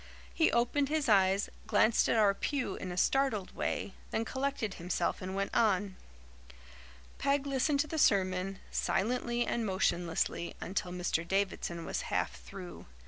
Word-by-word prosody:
He 320 - +3
opened 255 +4 +1
his 310 -2 0
eyes, 195 -2 +4 0.2
glanced 220 +1 +3
at - - +3
our 205 -2 +5
pew 255 0 -2
in 185 - -5
a 180 - -6
startled 260 -3 +1
way, 195 - -2 0.2
then 225 - -1
collected 265 -5 -2
himself 175 0 -2
and 185 +1 -4
went 200 0 -2
on. 200 -3 +2 1.2
Peg 280 0 +1
listened 280 +1 +1
to 305 - -3
the 315 +1 -3
sermon, 190 -3 +2
silently 240 +3 0
and 235 - -1
motionlessly, 175 -4 0
until 185 -1 -3
Mr. 175 -2 -1
Davidson 190 -3 -1
was - - -3
half - - -1
through. 85 +7 -10
200 Hz, 145 wpm, -32 LUFS, 185-255 Hz, 1.2 s, our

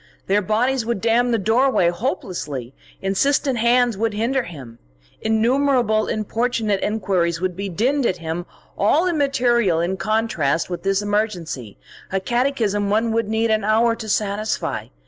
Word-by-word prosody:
Their 200 +2 +2
bodies 235 +6 +1
would 235 -2 -2
dam 235 +3 +2
the 235 - +2
doorway 225 -2 +3
hopelessly; 175 - -4 0.3
insistent 255 +6 +1
hands 240 0 +3
would 225 -1 0
hinder 245 +5 +1
him; 135 - -10 0.4
innumerable 230 0 +2
importunate 220 -1 -1
enquiries 185 -5 0
would 185 0 -2
be 200 +1 -4
dinned 245 - +1
at 185 - -1
him, 165 +1 -5 0.3
all 290 - +3
immaterial 245 - +2
in 175 +3 -1
contrast 180 -6 0
with 175 - -4
this 195 +1 0
emergency, 185 - -2 0.3
a 195 - +1
catechism 225 -3 0
one 225 +2 +1
would 225 -1 0
need 220 +1 +1
an 215 -1 +1
hour 225 +2 +3
to 220 - -7
satisfy. 210 +1 -1
215 Hz, 145 wpm, -21 LUFS, 190-235 Hz, 0.4 s, doorway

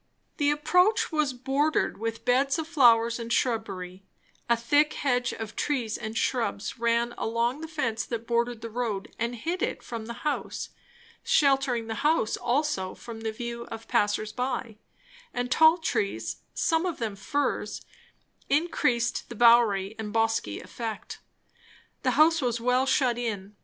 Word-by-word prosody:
The 290 -2 +2
approach 360 +9 +3
was 305 -3 +1
bordered 270 +3 0
with 225 0 -4
beds 270 +4 +3
of 320 -1 -3
flowers 235 -7 +4
and 230 0 -6
shrubbery; 195 -7 -1 0.5
a 235 - +4
thick 290 +6 +3
hedge 250 -3 0
of 220 -2 -7
trees 245 -7 -1
and 220 +1 -5
shrubs 235 -3 -1
ran 235 +1 +1
along 235 +5 0
the 320 - -5
fence 240 -8 -2
that 230 -1 -4
bordered 235 0 0
the 230 - -6
road 220 -4 -3
and 235 +1 -1
hid 335 +10 -3
it - - -2
from 230 -2 -6
the 235 +5 -8
house, 300 - -2 0.5
sheltering 270 -5 +2
the 225 -1 -4
house 300 -7 +2
also 240 -7 -1
from 230 -2 -9
the 220 0 -2
view 235 +1 -6
of 225 -1 -9
passers 210 +1 +1
by; 250 -3 -3 0.6
and 245 0 -2
tall 320 +4 +6
trees, 205 - -2 0.2
some 325 +2 +1
of 345 - -3
them 225 -4 -3
firs, 285 +9 -2 0.6
increased 250 -6 +1
the 235 - -7
bowery 225 -4 +5
and 210 -1 -4
bosky 225 - 0
effect. 225 -2 -6 0.8
The - - +1
house 325 +1 +5
was 240 -2 0
well 250 +3 +2
shut 250 -3 +2
in. 210 -4 -4
235 Hz, 150 wpm, -27 LUFS, 225-275 Hz, 0.8 s, tall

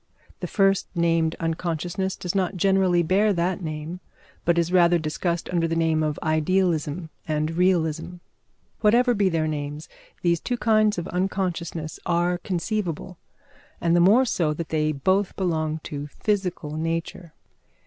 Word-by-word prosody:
The - - -4
first 195 -2 +2
named 165 -1 +2
unconsciousness 170 +3 -2
does 180 - -4
not 190 -1 0
generally 190 -2 +3
bear 195 +6 +3
that 180 +1 -1
name, 155 +2 -5 0.5
but 170 0 +3
is 170 0 +1
rather 175 -1 +5
discussed 170 +2 -2
under 170 -2 +1
the 165 - -1
name 160 -1 +2
of 150 -1 -1
idealism 160 0 0 0.2
and 155 0 0
realism. 170 -1 +1 0.6
Whatever 240 +3 +4
be 200 -3 +2
their 165 -2 0
names, 150 0 -4 0.3
these 170 -1 +2
two 245 - -2
kinds 215 -3 +3
of 170 - -3
unconsciousness 175 -3 -2
are 175 +1 +1
conceivable, 180 -1 -3 0.6
and 170 0 +2
the - - +5
more 210 +9 +5
so 160 -9 0
that 165 0 -5
they 155 -1 +1
both 185 +7 +1
belong 160 -4 -1
to 145 0 -5
physical 180 -3 -2
nature. 165 +1 -4
170 Hz, 145 wpm, -24 LUFS, 160-185 Hz, 0.6 s, rather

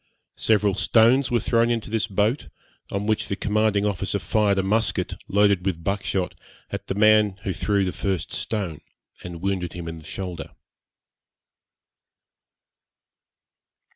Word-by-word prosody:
Several 105 -2 +3
stones 120 +7 +4
were 120 - +2
thrown 115 0 +2
into 115 -3 -2
this 115 0 0
boat, 105 +6 0 0.4
on 100 +1 -3
which 110 0 0
the 100 - -2
commanding 105 0 +1
officer 100 -4 -1
fired 105 -2 +1
a 95 - +2
musket, 110 +4 0
loaded 100 -2 +3
with 90 -4 -2
buck 100 +2 -1
shot, 95 -2 -1 0.4
at - - -5
the - - -2
man 105 -1 +4
who 95 - -2
threw 100 +1 0
the 90 - -1
first 95 -3 -3
stone, 90 -8 -3 0.4
and 85 -1 -8
wounded 95 -3 -1
him 85 -1 -7
in 80 0 -6
the - - -15
shoulder. 90 +1 -6
100 Hz, 140 wpm, -24 LUFS, 95-110 Hz, 0.4 s, stones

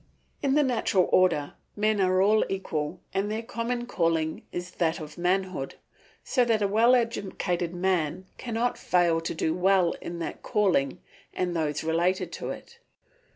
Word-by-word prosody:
In 275 -1 +2
the 300 - +5
natural 225 -8 +2
order 175 -6 +3 0.2
men 210 -1 +1
are 185 0 +3
all 215 +2 +4
equal 155 -6 -3
and 195 +2 0
their 220 +2 -3
common 240 +1 -3
calling 165 -7 0
is 175 0 -5
that 165 -1 0
of 155 -1 -8
manhood, 180 -4 -1 0.5
so 250 - +2
that 225 -3 +2
a - - +3
well 230 +5 +5
educated 190 -7 -1
man 180 -1 0
cannot 240 0 -1
fail 170 -2 +2
to 165 - -4
do 160 0 0
well 180 0 +3
in 170 - -6
that 165 - -5
calling 180 -10 +1 0.4
and 180 -1 -1
those 150 -2 -1
related 170 +3 0
to - - -5
it. 470 0 -9
185 Hz, 155 wpm, -27 LUFS, 170-215 Hz, 0.5 s, the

